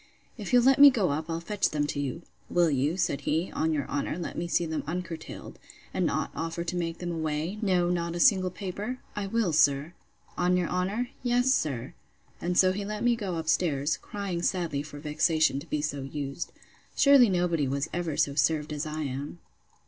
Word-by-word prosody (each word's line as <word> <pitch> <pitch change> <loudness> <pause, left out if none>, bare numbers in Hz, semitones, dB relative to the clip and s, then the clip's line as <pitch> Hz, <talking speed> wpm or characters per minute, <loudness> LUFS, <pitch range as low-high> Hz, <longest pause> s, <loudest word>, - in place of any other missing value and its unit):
If 210 -6 -6
you'll 245 -1 +5
let 270 +2 +5
me 285 - +12
go 215 - +1
up 155 +3 -3
I'll 165 0 -2
fetch 200 +4 0
them 150 -1 0
to 145 - -3
you. 145 +4 -3 0.3
Will 175 -2 +3
you, 145 +5 0
said 175 -6 0
he, 160 +4 -1
on 160 0 0
your 145 -4 -1
honour, 145 +3 -2
let 175 - -5
me 170 - -3
see 170 0 +1
them 160 -2 -2
uncurtailed, 170 -1 -6 0.3
and - - +1
not - - -1
offer 165 +1 -3
to 175 +1 -3
make 170 -1 -2
them 175 -1 -4
away; 160 +4 -2
no 180 -4 +2
not 170 -1 -2
a - - -3
single 185 -3 +4
paper?—I 200 +3 -5
will, 210 -5 0
sir.—On 155 +4 0
your 180 -2 0
honour? 195 +7 -1
Yes, 245 +1 +3
sir. 135 - -2 0.5
And 175 0 -1
so 185 -1 +6
he 200 +2 -3
let 210 +1 -4
me 240 0 +4
go 200 -6 -3
up 160 -1 -4
stairs, 155 -3 +1
crying 195 -4 -4
sadly 170 -6 -1
for 145 0 -9
vexation 155 -1 +1
to 155 - -11
be 150 -1 -1
so 145 -2 -2
used. 140 +2 -5 0.4
Sure 280 0 +6
nobody 175 - +3
was 140 +3 -1
ever 170 -4 -2
so 140 - +2
served 150 +1 +1
as 150 +1 -3
I 155 +1 -4
am! 140 +4 -5
170 Hz, 200 wpm, -28 LUFS, 150-185 Hz, 0.5 s, me